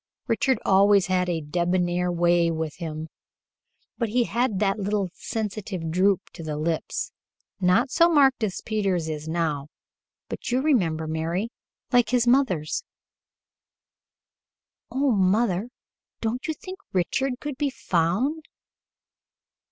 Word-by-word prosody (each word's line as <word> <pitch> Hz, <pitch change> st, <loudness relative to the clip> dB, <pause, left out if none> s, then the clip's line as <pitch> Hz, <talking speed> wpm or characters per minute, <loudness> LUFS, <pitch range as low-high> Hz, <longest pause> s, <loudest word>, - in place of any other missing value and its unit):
Richard 245 Hz, +2 st, +2 dB
always 200 Hz, 0 st, +5 dB
had 180 Hz, -1 st, +1 dB
a 165 Hz, -2 st, -1 dB
debonair 175 Hz, +3 st, 0 dB
way 175 Hz, 0 st, +3 dB
with 160 Hz, -2 st, -3 dB
him, 160 Hz, -2 st, -5 dB, 0.9 s
but 235 Hz, -3 st, 0 dB
he 240 Hz, +3 st, +2 dB
had 235 Hz, -2 st, 0 dB
that 195 Hz, +1 st, +1 dB
little, 200 Hz, -2 st, -1 dB
sensitive 195 Hz, -6 st, -4 dB
droop 185 Hz, +2 st, +2 dB
to -, -, -10 dB
the 155 Hz, -2 st, -4 dB
lips 160 Hz, +1 st, -2 dB, 0.5 s
not 185 Hz, +7 st, +3 dB
so 335 Hz, +4 st, +5 dB
marked 270 Hz, -7 st, +4 dB
as 195 Hz, -4 st, -2 dB
Peter's 195 Hz, -6 st, 0 dB
is 155 Hz, -1 st, -5 dB
now 160 Hz, -4 st, -1 dB, 0.6 s
but -, -, -5 dB
you 250 Hz, +1 st, +2 dB
remember, 180 Hz, -, +1 dB
Mary 165 Hz, +7 st, -2 dB, 0.4 s
like 245 Hz, -3 st, +4 dB
his 245 Hz, -1 st, +2 dB
mother's." 240 Hz, -, +2 dB, 2.1 s
"Oh, 275 Hz, 0 st, +1 dB
mother, 200 Hz, +1 st, +2 dB, 0.5 s
don't 235 Hz, +3 st, -2 dB
you 315 Hz, -, -1 dB
think 375 Hz, +3 st, -9 dB
Richard 250 Hz, +9 st, 0 dB
could 295 Hz, -3 st, -5 dB
be 290 Hz, -2 st, +1 dB
found?" 245 Hz, -, 0 dB
190 Hz, 125 wpm, -25 LUFS, 170-240 Hz, 2.1 s, always